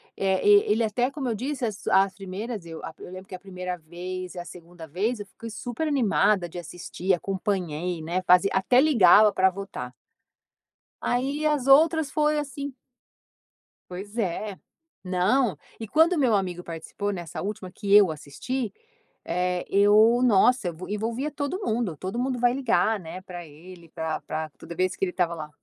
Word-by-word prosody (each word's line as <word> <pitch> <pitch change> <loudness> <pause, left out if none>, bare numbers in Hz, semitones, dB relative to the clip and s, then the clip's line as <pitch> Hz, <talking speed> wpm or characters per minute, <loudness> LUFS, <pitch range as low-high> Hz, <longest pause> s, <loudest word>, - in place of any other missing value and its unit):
É, 190 0 0
e 205 0 +6
ele 225 +2 +2
até 240 +4 0
como 275 -3 -3
eu 225 - -1
disse, 265 +3 -4
as 205 -3 -5
as 195 0 +4
primeiras 195 +2 -6
eu 165 -1 -9
a - - -5
eu - - -10
lembro 185 +1 -9
que 185 - -7
a - - -9
1º 180 -2 -6
vez 180 +3 -7
e - - -5
a 175 - -6
2º 170 -1 -11
vez 205 +9 -1
eu 205 - -6
fiquei 230 +3 -10
super 245 +7 -4
animada 215 - +2
de 175 - -9
assistir, 175 +2 -3
acompanhei, 180 -3 -2
né, 170 +4 -2
fazia 180 +2 +5
até 190 +6 +3
ligava 215 - +6
para 190 -1 +3
votar. 180 -10 -7 1.1
Aí 275 +5 -1
as 295 -4 +1
outras 310 +2 +5
foi 300 0 +2
assim 285 -1 -5 1.2
Pois 200 +5 -8
é, 200 -1 -2 0.4
não, 185 +6 +1 0.2
e 225 - -6
quando 325 - +4
meu 245 -6 +3
amigo 180 -3 -2
participou, 170 +5 -5
nessa 175 -4 -6
última 195 -2 -5
que 200 +1 -2
eu 200 -5 +7
assisti, 220 - -4 0.5
eh, 180 0 -1
eu 210 +4 +5
nossa, 245 -1 +4
evo 170 +3 -8
envolvia 230 +7 -2
todo 290 +7 -3
mundo, 220 - -1
todo 190 +10 -5
mundo 255 0 -1
vai, 245 0 +3
ligar, 230 -4 +1
né, 180 +1 -8
para 175 -2 -9
ele 170 +3 -14
pra 160 -1 -3
pra 155 0 -4
toda 170 - -9
vez 185 +1 +1
que 195 - 0
ele 180 - -3
estava 175 -2 0
lá. 155 -2 -7
195 Hz, 175 wpm, -26 LUFS, 180-245 Hz, 1.2 s, eu